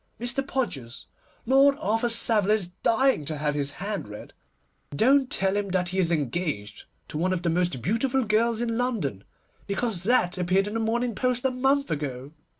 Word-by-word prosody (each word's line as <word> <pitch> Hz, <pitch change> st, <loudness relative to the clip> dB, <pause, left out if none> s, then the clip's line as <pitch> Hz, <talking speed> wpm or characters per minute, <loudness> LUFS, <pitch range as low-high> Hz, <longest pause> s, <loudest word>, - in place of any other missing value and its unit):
Mr. 240 Hz, +3 st, -1 dB
Podgers, 150 Hz, -, -4 dB, 0.4 s
Lord 275 Hz, +3 st, +5 dB
Arthur 225 Hz, -4 st, 0 dB
Savile 220 Hz, -3 st, +2 dB
is 200 Hz, -5 st, -1 dB
dying 260 Hz, -, +2 dB
to 155 Hz, +1 st, -4 dB
have 150 Hz, 0 st, -1 dB
his 145 Hz, -1 st, -3 dB
hand 200 Hz, -, -4 dB
read. 105 Hz, 0 st, -10 dB, 0.6 s
Don't 265 Hz, -, +4 dB
tell 195 Hz, -8 st, 0 dB
him 205 Hz, -1 st, -1 dB
that 180 Hz, -1 st, 0 dB
he 190 Hz, +2 st, -2 dB
is 175 Hz, -2 st, +2 dB
engaged 140 Hz, -, -2 dB, 0.2 s
to 150 Hz, -, -4 dB
one 185 Hz, +3 st, +1 dB
of 180 Hz, -2 st, -2 dB
the 170 Hz, -, +1 dB
most 170 Hz, -8 st, -1 dB
beautiful 255 Hz, -, +1 dB
girls 225 Hz, +1 st, +1 dB
in 230 Hz, -1 st, -1 dB
London, 185 Hz, -, -1 dB, 0.4 s
because 200 Hz, -2 st, -1 dB
that 190 Hz, -6 st, +2 dB
appeared 185 Hz, +2 st, +2 dB
in 210 Hz, -, -5 dB
the 225 Hz, -, -1 dB
Morning 235 Hz, +2 st, 0 dB
Post 250 Hz, +2 st, -1 dB
a 265 Hz, -, +3 dB
month 270 Hz, +2 st, +1 dB
ago. 140 Hz, -3 st, -4 dB
205 Hz, 180 wpm, -26 LUFS, 165-240 Hz, 0.6 s, Lord